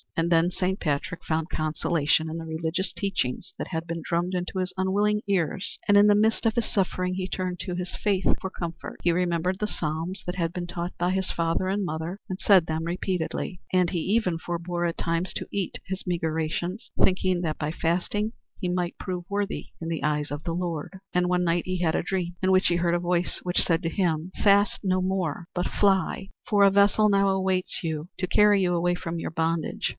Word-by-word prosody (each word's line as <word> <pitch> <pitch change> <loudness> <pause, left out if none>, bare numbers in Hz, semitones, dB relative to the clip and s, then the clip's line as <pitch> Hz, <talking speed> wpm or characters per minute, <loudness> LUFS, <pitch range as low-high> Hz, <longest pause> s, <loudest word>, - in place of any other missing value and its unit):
And 165 +1 +1
then 165 +1 +4
Saint 190 +1 -1
Patrick 150 +3 -2
found 160 0 -1
consolation 155 0 +1
in 160 - -4
the 165 - -5
religious 160 +3 -2
teachings 185 -4 -2
that - - -4
had 165 -2 -3
been 165 0 -3
drummed 175 +3 -1
into 180 +1 -2
his 185 0 -1
unwilling 205 +3 +1
ears, 190 +1 0
and 205 - +5
in 205 +1 +7
the 205 - +6
midst 220 +3 +2
of 225 - +2
his 235 -2 +1
suffering 185 -2 0
he 185 0 -2
turned 185 -2 -3
to 180 -3 -3
his 180 0 -4
faith 195 -3 0 0.2
for 190 - -3
comfort. 170 -2 -6
He 175 - +4
remembered 180 +1 0
the 210 - 0
psalms 165 +1 -3
that 180 - -3
had 170 -2 -1
been 175 -1 -4
taught 175 0 -4
by 175 +1 +1
his 190 0 0
father 165 +2 0
and 200 0 0
mother 165 +3 -4
and 185 0 -4
said 190 -5 +5
them 160 0 -2
repeatedly, 180 0 -2
and 180 -2 +3
he 175 - 0
even 190 -1 +1
forbore 175 +1 -2
at 170 - -3
times 170 +2 -1
to - - -4
eat 200 -3 -2
his 190 0 -4
meagre 170 -3 -1
rations, 165 +5 -3
thinking 185 -1 +3
that 160 -3 -2
by 150 0 -1
fasting 185 +7 -1 0.3
he 180 - -1
might 180 -1 -2
prove 180 -1 -4
worthy 200 0 -2
in 165 - -5
the 165 -2 -2
eyes 150 -1 0
of 145 +2 -5
the 165 - -2
Lord. 175 +1 -3
And 180 0 +2
one 180 0 +2
night 170 0 +1
he 185 0 -2
had 160 -2 +2
a - - +1
dream 175 -2 -2
in 190 - +4
which 185 0 +5
he 175 - +3
heard 170 0 +1
a - - +1
voice, 175 0 0
which 180 0 +2
said 165 -1 +1
to 165 - 0
him: 170 -1 0
"Fast 200 0 +4
no 185 -1 +2
more, 185 -3 -1
but 180 0 0
fly, 195 -1 +1 0.2
for 205 -2 +4
a 200 - +8
vessel 200 +2 +5
now 200 -1 +4
awaits 190 -1 0
you 160 0 -3
to 185 - 0
carry 205 +1 +5
you 175 -1 +2
away 175 +1 +2
from 170 -1 -4
your 165 - -4
bondage. 165 0 -1
180 Hz, 220 wpm, -26 LUFS, 165-190 Hz, 0.3 s, a